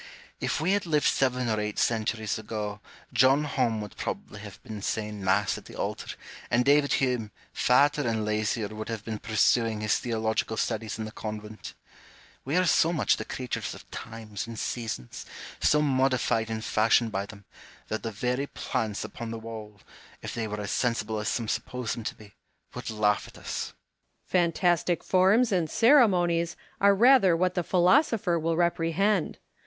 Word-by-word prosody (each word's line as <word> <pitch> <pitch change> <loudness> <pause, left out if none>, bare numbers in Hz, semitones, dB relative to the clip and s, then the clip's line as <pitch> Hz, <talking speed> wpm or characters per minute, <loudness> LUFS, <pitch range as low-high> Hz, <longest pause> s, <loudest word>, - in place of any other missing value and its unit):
If - - -1
we 165 +5 +1
had 200 -3 +1
lived 150 -2 +2
seven 125 -2 +2
or 110 -1 0
eight 105 0 -3
centuries 110 -1 0
ago, 105 -1 -5 0.3
John 130 +4 +5
Home 125 -6 0
would 105 -2 -8
probably - - -5
have - - -10
been 110 -2 -7
saying 105 -1 -3
Mass 95 +2 +1
at - - -19
the - - -12
altar, - - -4 0.3
and 125 +1 +2
David 145 0 +4
Hume, 125 -5 0 0.2
fatter 145 +4 +3
and 110 -2 0
lazier, 105 0 -1
would 110 +1 -7
have 110 -2 -5
been 110 -2 -4
pursuing 110 0 +2
his 110 -1 +1
theological 110 -1 -1
studies 110 -2 -2
in 110 - -4
the 110 - -7
convent. 105 0 -7 0.7
We 145 +6 -1
are 185 - +3
so 165 0 +4
much 160 -5 +2
the - - -5
creatures 125 -2 -4
of - - -14
times 110 +1 -7
and 115 -1 -7
seasons, 110 - -5 0.3
so 150 0 +3
modified 130 -5 +1
and 110 0 -4
fashioned 115 +1 +3
by 100 0 -2
them, 100 -2 -13 0.4
that 110 - -2
the 115 - -3
very 125 +6 -1
plants 110 -8 -3
upon 115 -1 -7
the 115 - -4
wall, 110 -2 -9 0.4
if - - -5
they 115 -2 -2
were 105 0 -4
as 100 - -4
sensible 110 -3 0
as 105 - -3
some 115 0 -1
suppose 115 +2 -2
them 115 - -6
to - - -3
be, 105 -2 -16 0.4
would - - -6
laugh 105 -2 +1
at - - -14
us. - - -4
Home. - - -15 0.5
Fantastic 175 0 +1
forms 200 +6 +4
and 175 -5 +1
ceremonies 185 - +4 0.2
are 200 0 +5
rather 225 -6 +6
what 180 +1 +1
the 180 - 0
philosopher 185 - +3
will 165 +1 0
reprehend. 175 +2 +1
115 Hz, 175 wpm, -27 LUFS, 110-165 Hz, 0.7 s, rather